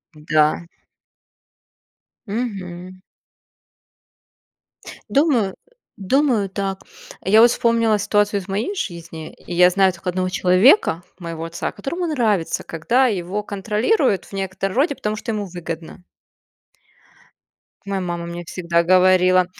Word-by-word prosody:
Д 150 0 -16
да. 155 +2 +3 1.6
Мгм. 185 -5 -5 2.1
Думаю, 270 -9 +2
э, - - -16 0.4
думаю 225 -1 +1
так. 195 0 -3 0.4
Я 215 +4 +5
вот 240 +1 +7
вспомнила 230 -3 +2
ситуацию 205 0 +1
из 190 - -11
моей 210 - -2
жизни, 170 - -6
и - - -10
я 180 +1 +6
знаю 190 +1 +3
только 180 +1 -5
1 185 +1 -1
человека, 185 - +4 0.2
моего 165 -2 -6
отца. 165 +1 -4
Которому 345 +6 -4
нравится, 220 - 0
когда 235 +12 +1
его 200 -1 -2
контролируют 210 - 0
в - - -18
некотором 195 0 -3
роде, 285 +3 +2
потому 210 -3 -3
что 220 - -5
ему 210 -2 -3
выгодно. 170 -2 -8 1.8
Моя 195 -1 -2
мама 175 -1 -4
мне 170 0 -7
всегда 170 -1 0
говорила: 185 0 +4
190 Hz, 120 wpm, -21 LUFS, 175-215 Hz, 2.1 s, вот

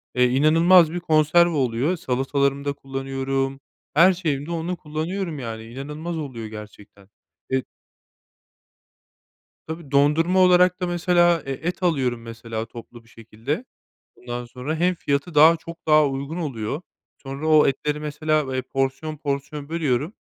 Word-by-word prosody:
Eee, 125 0 +4
inanılmaz 160 +6 +5
bir 175 - -2
konserve 160 +1 +4
oluyor. 135 +3 0
Salatalarımda 140 +1 -1
kullanıyorum, 135 0 -3 0.3
her 170 +5 +6
şeyimde 155 -4 -3
onu 170 +2 -3
kullanıyorum, 160 +2 -4
yani, 115 -3 -6
inanılmaz 150 +8 -6
oluyor 130 -8 -6
gerçekten. 105 -2 -12 0.4
E 130 -1 +1 2.0
Tabii, 160 -3 -7
dondurma 155 +6 +3
olarak 180 0 +5
da, 180 - 0
mesela, 175 -1 +3
e 135 - -4
et 170 +7 -4
alıyorum, 130 -9 +1
mesela, 115 -1 -6
toplu 115 0 -12
bir 115 - -24
şekilde. 115 - -5 0.5
Ondan 120 0 -6
sonra 125 +5 -5
hem 180 +3 +1
fiyatı 140 +1 -2 0.3
çok 165 +1 -11
daha 155 -1 +5
uygun 140 +4 -4
oluyor, 135 -3 -3 0.4
sonra 135 +3 -6
o 155 -1 +6
etleri, 150 +2 -1
mesela, 150 -2 -1
eee, 130 - 0
porsiyon 135 +4 -3
porsiyon 145 0 -4
bölüyorum, 155 - -1
145 Hz, 130 wpm, -23 LUFS, 130-165 Hz, 2.0 s, her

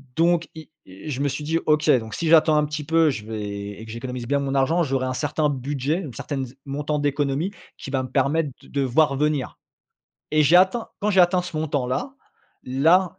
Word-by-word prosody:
Donc 170 0 +2
i 160 -1 -11 0.2
i 95 +10 -10
je 135 -3 -3
me 145 - +1
suis 140 +2 -4
dit: 160 +2 0
«OK, 155 0 +2
donc 110 -1 -9
si 170 - -2
j'attends 160 -1 +6
un 150 - +3
petit 150 0 -5
peu, 160 +1 +3
je 105 -7 -4
vais 105 -2 -5
et 110 - -9
que 110 - -9
j'économise 120 +1 -6
bien 140 +2 +1
mon 140 -1 -2
argent, 160 +6 +2
j'aurais 135 -3 -1
un 130 - -2
certain 150 +3 0
budget, 140 +3 -2
une 150 -10 -7
certaine 135 +3 -4
z 125 - -13
montant 145 +2 -2
d'économies, 145 +4 0 0.3
qui - - -8
va 130 -2 0
me 130 - -7
permettre 140 +4 +1
de - - -17
de 140 - -1
voir 140 +2 +2
venir» 150 -2 -1 0.7
et 155 0 +4
j'ai 155 +4 +6
atteint 190 +6 +3
quand 210 +1 +1
j'ai 190 - +5
atteint 180 +1 +4
ce 175 -3 -7
montant-là, 145 - -2 0.5
là 165 +8 +2
145 Hz, 220 wpm, -23 LUFS, 130-160 Hz, 0.7 s, j'attends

